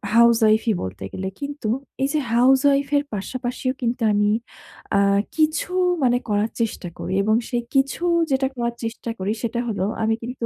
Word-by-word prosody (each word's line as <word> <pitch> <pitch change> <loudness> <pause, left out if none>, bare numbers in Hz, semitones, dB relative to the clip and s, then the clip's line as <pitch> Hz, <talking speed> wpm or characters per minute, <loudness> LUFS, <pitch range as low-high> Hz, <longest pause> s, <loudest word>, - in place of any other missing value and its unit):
হাউজওয়াইফই 230 -1 +5
বলতে 95 +1 -6
গেলে। 190 - -4
কিন্তু 285 -5 -5 0.4
এইযে 290 +3 +1
হাউজওয়াইফের 275 +3 +4
পাশাপাশিও 250 +5 -3
কিন্তু 240 +1 -1
আমি 205 0 +2 0.7
আ - - +5 0.4
কিছু 315 +2 +1 0.3
মানে 245 -1 +4
করার 210 +2 +1
চেষ্টা 220 -5 -2
করি - - -4
এবং 215 +1 +3
সে 245 - -1 0.2
কিছু 275 +5 +1 0.3
যেটা 265 0 +2
করার 235 -1 -2
চেষ্টা 230 +1 -4
করি, 195 +3 -1
সেটা 235 +1 -1
হলো 205 -4 -1 0.2
আমি 225 - +2
কিন্তু 245 -1 -4
235 Hz, 150 wpm, -22 LUFS, 220-270 Hz, 0.7 s, হাউজওয়াইফই